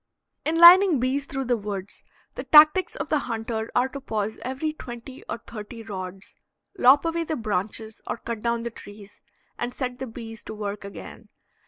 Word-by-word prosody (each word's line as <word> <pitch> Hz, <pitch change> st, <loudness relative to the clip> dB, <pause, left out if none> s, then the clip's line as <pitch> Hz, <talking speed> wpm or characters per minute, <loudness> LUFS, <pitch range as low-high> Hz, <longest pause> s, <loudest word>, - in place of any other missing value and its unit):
In 320 Hz, +2 st, 0 dB
lining 345 Hz, -2 st, +9 dB
bees 265 Hz, +3 st, 0 dB
through 270 Hz, -2 st, -4 dB
the 245 Hz, 0 st, +2 dB
woods, 205 Hz, -3 st, -6 dB, 0.3 s
the -, -, -6 dB
tactics 310 Hz, +5 st, +6 dB
of -, -, -5 dB
the 305 Hz, -, +2 dB
hunter 225 Hz, -1 st, -3 dB
are 245 Hz, +1 st, +3 dB
to 275 Hz, +1 st, -8 dB
pause 220 Hz, -4 st, -3 dB
every 270 Hz, +5 st, -3 dB
twenty 250 Hz, -2 st, -10 dB
or -, -, -2 dB
thirty 225 Hz, +1 st, -9 dB
rods, 190 Hz, -2 st, -7 dB, 0.4 s
lop 270 Hz, +5 st, +6 dB
away 330 Hz, 0 st, 0 dB
the 315 Hz, -, -3 dB
branches 215 Hz, 0 st, -3 dB
or -, -, -3 dB
cut 230 Hz, -2 st, -6 dB
down 235 Hz, 0 st, -1 dB
the 235 Hz, -, -4 dB
trees, 205 Hz, -2 st, -13 dB, 0.4 s
and 240 Hz, +1 st, -3 dB
set 250 Hz, -2 st, -4 dB
the 265 Hz, -, -4 dB
bees 225 Hz, -1 st, -9 dB
to 220 Hz, -, -7 dB
work 205 Hz, -1 st, -5 dB
again. 200 Hz, 0 st, -10 dB
235 Hz, 180 wpm, -25 LUFS, 215-275 Hz, 0.4 s, lining